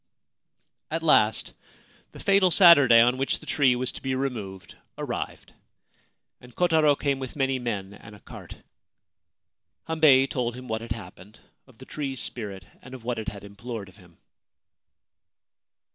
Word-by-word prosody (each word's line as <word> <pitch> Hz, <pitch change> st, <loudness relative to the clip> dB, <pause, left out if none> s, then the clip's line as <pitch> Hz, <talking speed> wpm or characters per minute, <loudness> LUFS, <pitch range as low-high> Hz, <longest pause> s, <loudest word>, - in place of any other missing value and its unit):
At -, -, -3 dB
last -, -, +2 dB, 0.6 s
the -, -, -13 dB
fatal 195 Hz, -2 st, +3 dB
Saturday 155 Hz, -, +7 dB
on 125 Hz, +2 st, +2 dB
which 135 Hz, -, 0 dB
the -, -, -14 dB
tree 130 Hz, -4 st, +2 dB
was 125 Hz, +1 st, -2 dB
to -, -, -11 dB
be 130 Hz, -1 st, -2 dB
removed 105 Hz, -9 st, -5 dB, 0.2 s
arrived, -, -, -6 dB, 0.9 s
and 125 Hz, -1 st, -17 dB
Kotaro 160 Hz, -4 st, +3 dB
came 140 Hz, -2 st, -1 dB
with 130 Hz, -2 st, -7 dB
many 135 Hz, -2 st, 0 dB
men 100 Hz, -5 st, -4 dB
and 105 Hz, 0 st, -14 dB
a -, -, -16 dB
cart. -, -, -12 dB, 1.3 s
Hambei 155 Hz, -5 st, +5 dB
told 125 Hz, -3 st, -3 dB
him 125 Hz, 0 st, -10 dB
what 110 Hz, -1 st, -3 dB
had 115 Hz, -1 st, -4 dB
happened 100 Hz, 0 st, -13 dB
— -, -, -51 dB
of 130 Hz, -4 st, -21 dB
the 130 Hz, -, -13 dB
tree's 135 Hz, -3 st, -5 dB
spirit 100 Hz, -6 st, -5 dB, 0.2 s
and 130 Hz, +1 st, -11 dB
of 125 Hz, -, -12 dB
what 120 Hz, -1 st, -3 dB
it 110 Hz, -, -7 dB
had 100 Hz, -2 st, -7 dB
implored 100 Hz, 0 st, -8 dB
of 95 Hz, -, -20 dB
him. 90 Hz, -4 st, -20 dB
125 Hz, 160 wpm, -25 LUFS, 105-135 Hz, 1.3 s, Saturday